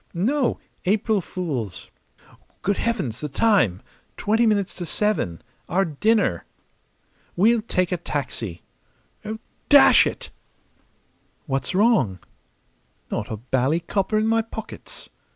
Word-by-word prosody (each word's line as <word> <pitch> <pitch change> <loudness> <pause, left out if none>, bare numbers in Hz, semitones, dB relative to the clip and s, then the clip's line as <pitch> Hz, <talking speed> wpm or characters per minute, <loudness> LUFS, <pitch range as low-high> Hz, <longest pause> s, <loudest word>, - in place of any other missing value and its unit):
"No. 250 +9 +1 0.3
April 210 +1 +2
fools! 135 - -4 0.7
Good 200 0 +1
heavens, 145 - -2
the 150 - -3
time! 140 - +2 0.3
Twenty 225 +3 +2
minutes 200 -3 +1
to 175 - -4
seven. 210 - -1 0.3
Our 195 +2 +2
dinner!" 190 - +1 0.9
"We'll 225 +5 +4
take 185 -5 -1
a 180 - +1
taxi.... 125 - -4 1.1
Dash 285 -2 +8
it!" - - -6 1.1
"What's 135 +3 -2
wrong?" 195 - +3 0.9
"Not 105 - -3
a 110 - -3
bally 130 +7 0
copper 195 +5 0
in 215 - +2
my 225 0 +3
pockets!" 220 0 -9
185 Hz, 110 wpm, -23 LUFS, 135-220 Hz, 1.1 s, Dash